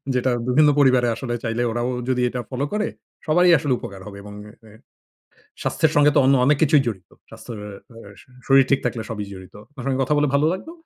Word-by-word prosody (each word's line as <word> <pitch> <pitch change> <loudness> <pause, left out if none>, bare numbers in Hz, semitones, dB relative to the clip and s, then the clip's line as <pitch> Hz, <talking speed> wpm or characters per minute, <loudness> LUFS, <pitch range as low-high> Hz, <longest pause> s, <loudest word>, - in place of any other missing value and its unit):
যেটা, 125 +1 +1 0.2
বিভিন্ন 150 +4 +4
পরিবারে 130 -3 +4
আসলে 120 0 -5
চাইলে, 115 0 -2
ওরাও 120 +2 -2 0.2
যদি 125 -1 0
এটা 125 - -5
ফলো 130 +2 -2
করে, 210 0 0 0.4
সবারই 175 +3 +4
আসলে 145 -3 0
উপকার 100 -4 -9
হবে 100 -1 -10
এবং 105 0 -10 0.2
এ - - -13 0.2
এ - - -16 0.9
স্বাস্থ্যের 160 -1 0
সঙ্গে 145 0 +5
তো - - +4
অন্য 135 +1 +4
অনেক 145 +2 +4
কিছুই 150 -2 +4
জড়িত। 95 -6 -5 0.2
স্বাস্থ্যর 115 -3 -10 0.9
শরীর 135 0 +5
ঠিক 140 - +4
থাকলে 120 -2 -2
সবই 105 -2 -4
জড়িত। 95 -1 -12 0.2
আপনার 135 -4 -10
সঙ্গে 135 -1 0
কথা 135 +3 0
বলে 145 0 +2
ভালো 140 +2 +3
লাগবে, 190 - -7
130 Hz, 200 wpm, -22 LUFS, 120-150 Hz, 0.9 s, সঙ্গে